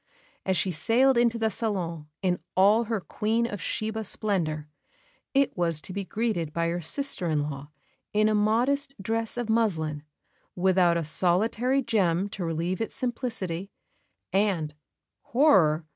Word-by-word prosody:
As 190 Hz, -1 st, +2 dB
she 180 Hz, +3 st, +1 dB
sailed 245 Hz, -, +3 dB
into 235 Hz, -1 st, +3 dB
the 220 Hz, -1 st, 0 dB
salon 175 Hz, -9 st, -3 dB, 0.2 s
in 180 Hz, -1 st, +1 dB, 0.2 s
all 210 Hz, +5 st, +5 dB
her 225 Hz, -1 st, -1 dB
Queen 220 Hz, +5 st, -1 dB
of 205 Hz, -6 st, -5 dB
Sheba 220 Hz, +6 st, -3 dB
splendour, 170 Hz, -8 st, -1 dB, 0.7 s
it 275 Hz, 0 st, +3 dB
was 170 Hz, -3 st, 0 dB
to 185 Hz, -, -8 dB
be 200 Hz, +1 st, -3 dB
greeted 190 Hz, -5 st, -2 dB
by 170 Hz, +1 st, 0 dB
her 175 Hz, +1 st, -2 dB
sister 275 Hz, -, -1 dB
in 150 Hz, -2 st, +1 dB
law 145 Hz, -1 st, -6 dB, 0.4 s
in 215 Hz, +1 st, +3 dB
a 215 Hz, -, +2 dB
modest 245 Hz, +7 st, +1 dB
dress 225 Hz, +4 st, -2 dB
of 240 Hz, -2 st, -2 dB
muslin, 165 Hz, -10 st, 0 dB, 0.5 s
without 180 Hz, -2 st, +3 dB
a 170 Hz, -, -1 dB
solitary 220 Hz, -, +1 dB
gem 195 Hz, -5 st, +1 dB
to 195 Hz, -, -5 dB
relieve 170 Hz, +4 st, -2 dB
its 225 Hz, -, -3 dB
simplicity; 200 Hz, -8 st, -3 dB, 0.6 s
and 190 Hz, -7 st, +1 dB, 0.5 s
horror! 180 Hz, -, +4 dB
195 Hz, 145 wpm, -27 LUFS, 170-225 Hz, 0.7 s, all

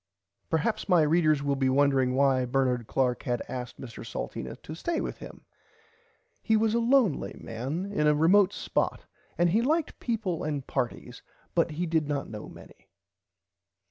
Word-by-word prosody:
Perhaps 165 Hz, +7 st, -1 dB
my 175 Hz, -4 st, +5 dB
readers 155 Hz, -2 st, +3 dB
will 140 Hz, -1 st, +1 dB
be 135 Hz, -1 st, +1 dB
wondering 135 Hz, -2 st, +3 dB
why 135 Hz, -1 st, +3 dB
Bernard 125 Hz, -2 st, 0 dB
Clark 125 Hz, -2 st, 0 dB
had 120 Hz, -1 st, -2 dB
asked 125 Hz, -1 st, -6 dB
Mr 120 Hz, -5 st, -8 dB
Salteena -, -, -5 dB
to 155 Hz, -, -7 dB
stay 330 Hz, -, -2 dB
with -, -, -4 dB
him. -, -, -11 dB, 1.0 s
He 220 Hz, -1 st, +2 dB
was 220 Hz, 0 st, +2 dB
a 235 Hz, -, +2 dB
lonely 235 Hz, -, +2 dB
man 135 Hz, -, -4 dB
in 150 Hz, -6 st, +1 dB
a 150 Hz, -, +4 dB
remote 185 Hz, +6 st, +5 dB
spot -, -, -2 dB, 0.3 s
and 175 Hz, 0 st, +3 dB
he 220 Hz, +5 st, +3 dB
liked 310 Hz, +5 st, 0 dB
peaple 210 Hz, -8 st, -2 dB
and 145 Hz, -3 st, -3 dB
partys 120 Hz, -, -4 dB, 0.3 s
but -, -, +2 dB
he 170 Hz, +4 st, -2 dB
did 160 Hz, -3 st, 0 dB
not 145 Hz, -2 st, -2 dB
know 105 Hz, -1 st, -7 dB
many. -, -, -15 dB
150 Hz, 165 wpm, -28 LUFS, 130-190 Hz, 1.0 s, my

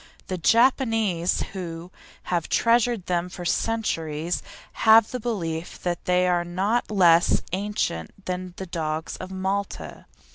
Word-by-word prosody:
The 185 Hz, -, -2 dB
Japanese, 225 Hz, -, +2 dB
who 175 Hz, -2 st, -6 dB, 0.3 s
have 175 Hz, -2 st, -2 dB
treasured 230 Hz, -3 st, +2 dB
them 175 Hz, 0 st, -1 dB
for 180 Hz, -1 st, -8 dB
centuries, 170 Hz, -7 st, -1 dB, 0.4 s
have 220 Hz, 0 st, +6 dB
the 250 Hz, -, -3 dB
belief 175 Hz, -8 st, -3 dB
that 175 Hz, -1 st, -2 dB
they 180 Hz, 0 st, +3 dB
are 175 Hz, -1 st, +2 dB
not 195 Hz, +7 st, -1 dB
less 175 Hz, -4 st, +4 dB
ancient 195 Hz, -, -3 dB
than 180 Hz, -1 st, -4 dB
the 190 Hz, -, -5 dB
dogs 160 Hz, -2 st, -3 dB
of 185 Hz, -, -7 dB
Malta. 190 Hz, +1 st, -4 dB
185 Hz, 130 wpm, -25 LUFS, 170-215 Hz, 0.4 s, have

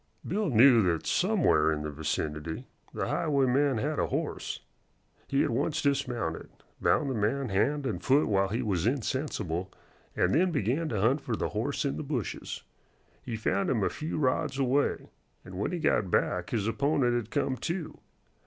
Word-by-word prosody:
Bill 205 Hz, +1 st, 0 dB
knew 120 Hz, -1 st, +7 dB
that 85 Hz, -5 st, 0 dB
somewhere 180 Hz, -, +3 dB
in 75 Hz, -1 st, -2 dB
the 75 Hz, -, -4 dB
vicinity 75 Hz, +1 st, -3 dB, 0.3 s
the -, -, -3 dB
highwayman 140 Hz, -3 st, +2 dB
had 145 Hz, +6 st, -1 dB
a -, -, +1 dB
horse. -, -, -3 dB, 0.7 s
He 140 Hz, -, +2 dB
at -, -, 0 dB
once 145 Hz, +6 st, 0 dB
dismounted, 125 Hz, -, -1 dB, 0.3 s
bound 150 Hz, -, +2 dB
the 135 Hz, -, -1 dB
man 125 Hz, +4 st, 0 dB
hand 140 Hz, +9 st, +1 dB
and -, -, -2 dB
foot 140 Hz, +3 st, +4 dB
while 100 Hz, -2 st, +2 dB
he 115 Hz, +6 st, -2 dB
was 95 Hz, -3 st, 0 dB
insensible, 110 Hz, -, -2 dB, 0.4 s
and 90 Hz, -, +2 dB
then 180 Hz, +6 st, +4 dB
began 145 Hz, -, 0 dB
to 110 Hz, -, -1 dB
hunt 130 Hz, +7 st, +3 dB
for 120 Hz, -, -2 dB
the -, -, -2 dB
horse 115 Hz, +8 st, -2 dB
in 140 Hz, -, -1 dB
the -, -, -4 dB
bushes. 135 Hz, -, -4 dB, 0.6 s
He 120 Hz, -, -5 dB
found 100 Hz, -3 st, 0 dB
him 115 Hz, -6 st, +1 dB
a -, -, +2 dB
few 155 Hz, +1 st, -4 dB
rods 135 Hz, -1 st, 0 dB
away, 135 Hz, +1 st, 0 dB, 0.3 s
and 90 Hz, -, -10 dB
when 105 Hz, -, -1 dB
he 180 Hz, -, -2 dB
got 105 Hz, -, +1 dB
back 90 Hz, 0 st, 0 dB
his 110 Hz, -3 st, -1 dB
opponent 135 Hz, +1 st, +1 dB
had 120 Hz, -3 st, -2 dB
come 130 Hz, -, 0 dB
to. 170 Hz, +5 st, -4 dB
125 Hz, 175 wpm, -29 LUFS, 100-145 Hz, 0.7 s, knew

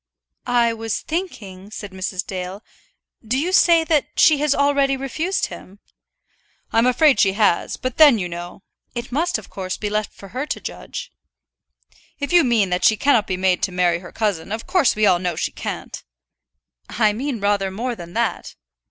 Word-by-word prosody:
"I 240 Hz, -1 st, +3 dB
was 225 Hz, -1 st, -3 dB
thinking," 210 Hz, -, -5 dB
said 210 Hz, -2 st, -8 dB
Mrs. 185 Hz, 0 st, -4 dB
Dale. 185 Hz, +2 st, -6 dB, 0.6 s
"Do 230 Hz, +3 st, -1 dB
you 330 Hz, +7 st, -1 dB
say 335 Hz, -3 st, +5 dB
that 315 Hz, -3 st, +1 dB
she 305 Hz, -3 st, +6 dB
has 295 Hz, -1 st, +2 dB
already 280 Hz, -1 st, +2 dB
refused 315 Hz, +8 st, -2 dB
him?" 195 Hz, -, -11 dB, 1.0 s
"I 225 Hz, -, +4 dB
am 235 Hz, -, +3 dB
afraid 255 Hz, -1 st, +4 dB
she 195 Hz, -1 st, +4 dB
has; 205 Hz, -4 st, +1 dB
but 255 Hz, -2 st, -4 dB
then 295 Hz, -7 st, +7 dB
you 180 Hz, -4 st, -2 dB
know 175 Hz, +2 st, -8 dB
" -, -, -44 dB
"It 240 Hz, +1 st, -5 dB
must 315 Hz, +4 st, 0 dB
of 220 Hz, -, -13 dB
course 185 Hz, -1 st, -4 dB
be 210 Hz, -1 st, -4 dB
left 215 Hz, 0 st, -1 dB
for 195 Hz, -, -13 dB
her 260 Hz, +8 st, -4 dB
to -, -, -3 dB
judge." -, -, -7 dB, 1.1 s
"If 285 Hz, +4 st, -3 dB
you 350 Hz, -2 st, +7 dB
mean 225 Hz, -7 st, +2 dB
that 180 Hz, 0 st, 0 dB
she 220 Hz, -, +5 dB
cannot 240 Hz, -6 st, +3 dB
be 185 Hz, -, -2 dB
made 185 Hz, -1 st, +1 dB
to -, -, 0 dB
marry 175 Hz, -1 st, +1 dB
her 175 Hz, -1 st, -11 dB
cousin, 205 Hz, -5 st, -2 dB
of 220 Hz, +1 st, -4 dB
course 360 Hz, -8 st, +2 dB
we 215 Hz, 0 st, +2 dB
all 185 Hz, -3 st, +4 dB
know 180 Hz, -2 st, -2 dB
she -, -, -2 dB
can't." -, -, -6 dB, 0.9 s
"I 215 Hz, -2 st, +2 dB
mean 255 Hz, +2 st, -3 dB
rather 200 Hz, -1 st, +1 dB
more 235 Hz, +6 st, -3 dB
than 175 Hz, -6 st, -10 dB
that." -, -, -2 dB
220 Hz, 190 wpm, -21 LUFS, 190-280 Hz, 1.1 s, then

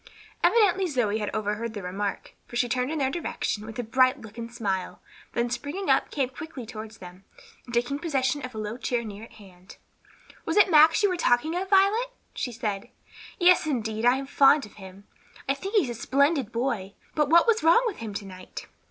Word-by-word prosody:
Evidently 390 Hz, -4 st, +4 dB
Zoe 230 Hz, -8 st, 0 dB
had 210 Hz, -, -2 dB
overheard 215 Hz, +2 st, -3 dB
the 205 Hz, -, -6 dB
remark, 195 Hz, +3 st, -4 dB
for -, -, -10 dB
she 245 Hz, +1 st, +2 dB
turned 250 Hz, +2 st, -1 dB
in 320 Hz, -, -2 dB
their 270 Hz, -2 st, 0 dB
direction 220 Hz, -9 st, -3 dB
with 225 Hz, -, -8 dB
a 245 Hz, -, -2 dB
bright 255 Hz, +4 st, +3 dB
look 220 Hz, -3 st, -12 dB
and 230 Hz, 0 st, -7 dB
smile; 195 Hz, -6 st, -3 dB, 0.3 s
then 235 Hz, 0 st, 0 dB
springing 285 Hz, +11 st, -2 dB
up -, -, +2 dB
came 270 Hz, -4 st, -1 dB
quickly 275 Hz, -1 st, -8 dB
toward 220 Hz, -1 st, -8 dB
them, 180 Hz, -2 st, -13 dB, 0.4 s
and 240 Hz, -, -11 dB
taking 245 Hz, +4 st, 0 dB
possession 285 Hz, -4 st, -1 dB
of 255 Hz, -2 st, -7 dB
a -, -, -6 dB
low 215 Hz, +2 st, -4 dB
chair 245 Hz, -2 st, -1 dB
near 210 Hz, -1 st, -8 dB
at -, -, -19 dB
hand, 185 Hz, -3 st, -16 dB, 0.7 s
"Was -, -, -2 dB
it 400 Hz, -2 st, +6 dB
Max 320 Hz, +5 st, +6 dB
you 405 Hz, -, +5 dB
were 365 Hz, -, -1 dB
talking 310 Hz, +2 st, +2 dB
of, 380 Hz, +1 st, -3 dB
Violet?" 400 Hz, +5 st, +4 dB, 0.3 s
she 245 Hz, -, -3 dB
said. 210 Hz, -4 st, -4 dB, 0.5 s
"Yes, 355 Hz, -3 st, +5 dB
indeed, 220 Hz, -6 st, -2 dB
I 245 Hz, +1 st, +5 dB
am 270 Hz, +1 st, -4 dB
fond 280 Hz, +1 st, +4 dB
of 210 Hz, -, -16 dB
him. 190 Hz, +1 st, -12 dB, 0.4 s
I 275 Hz, -, +2 dB
think 390 Hz, +10 st, -6 dB
he's 300 Hz, -, +3 dB
a -, -, -3 dB
splendid 275 Hz, +1 st, +1 dB
boy. 230 Hz, -5 st, -2 dB, 0.2 s
But 300 Hz, -2 st, +1 dB
what 340 Hz, +2 st, +6 dB
was 455 Hz, -1 st, +2 dB
wrong 335 Hz, +9 st, +5 dB
with 445 Hz, -6 st, -2 dB
him 220 Hz, -3 st, -7 dB
to 200 Hz, -, -5 dB
night?" 185 Hz, -1 st, -9 dB
245 Hz, 210 wpm, -26 LUFS, 215-310 Hz, 0.7 s, it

